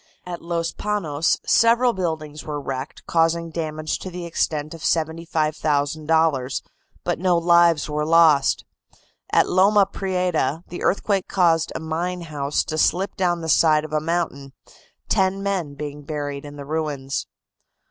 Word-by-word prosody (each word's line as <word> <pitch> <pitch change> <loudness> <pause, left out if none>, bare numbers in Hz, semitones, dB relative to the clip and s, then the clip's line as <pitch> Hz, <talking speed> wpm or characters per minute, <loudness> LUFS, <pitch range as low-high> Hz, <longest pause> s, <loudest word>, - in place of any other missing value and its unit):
At 175 -1 -6
Los 170 -1 -2
Panos 165 -8 0
several 235 +1 +4
buildings 160 -5 -4
were 150 -1 -4
wrecked, 135 0 -6
causing 165 0 +1
damage 155 -1 -3
to 185 - -6
the 175 -1 -6
extent 155 -2 -2
of 165 - -10
$75,000, 155 -3 0 0.4
but - - -1
no 180 -1 +3
lives 170 -2 +4
were 150 0 -1
lost. 155 -3 +4 0.7
At - - +4
Loma 195 +2 +4
Prieta 180 -6 -1
the 175 - -7
earthquake 195 0 +1
caused 165 -3 +2
a - - -2
mine 170 +3 -3
house 150 -3 -1
to 155 - -3
slip 185 +6 +1
down 175 -2 0
the 160 - -5
side 155 -1 +4
of 155 - -9
a 155 - +1
mountain, 155 -5 -2 0.5
ten 190 +1 +1
men 185 -8 -2
being 145 0 -6
buried 145 -1 -5
in 145 0 -9
the 140 -1 -8
ruins. 145 -3 -3
160 Hz, 145 wpm, -22 LUFS, 150-175 Hz, 0.7 s, several